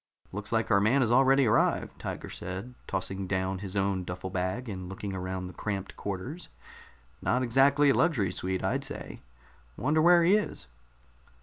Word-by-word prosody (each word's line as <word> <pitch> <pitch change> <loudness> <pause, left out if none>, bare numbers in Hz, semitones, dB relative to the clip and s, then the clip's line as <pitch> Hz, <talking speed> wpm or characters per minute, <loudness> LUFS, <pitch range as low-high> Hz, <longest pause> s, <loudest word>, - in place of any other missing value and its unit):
"Looks 105 +2 -5
like 115 0 +1
our 100 -2 +5
man 120 +7 +3
has 115 -2 +2
already 135 +2 +5
arrived," 105 - +1
Tiger - - -5
said, 95 +8 -6
tossing 95 +1 -3
down 95 0 -1
his 95 0 -6
own 95 -1 0
duffel 90 +1 -6
bag 95 +7 -2
and 95 -4 -6
looking 95 +1 -5
around 95 0 -4
the 90 - -8
cramped 100 +1 -4
quarters. 105 - -5 0.7
"Not 125 +1 +1
exactly 135 +4 +4
a - - +3
luxury 125 - +2
suite, 95 +1 -3
I'd - - 0
say. - - -8 0.6
Wonder 150 +5 +2
where 175 +1 +6
he 180 +4 +5
is?" 210 - 0
100 Hz, 170 wpm, -29 LUFS, 95-130 Hz, 0.7 s, where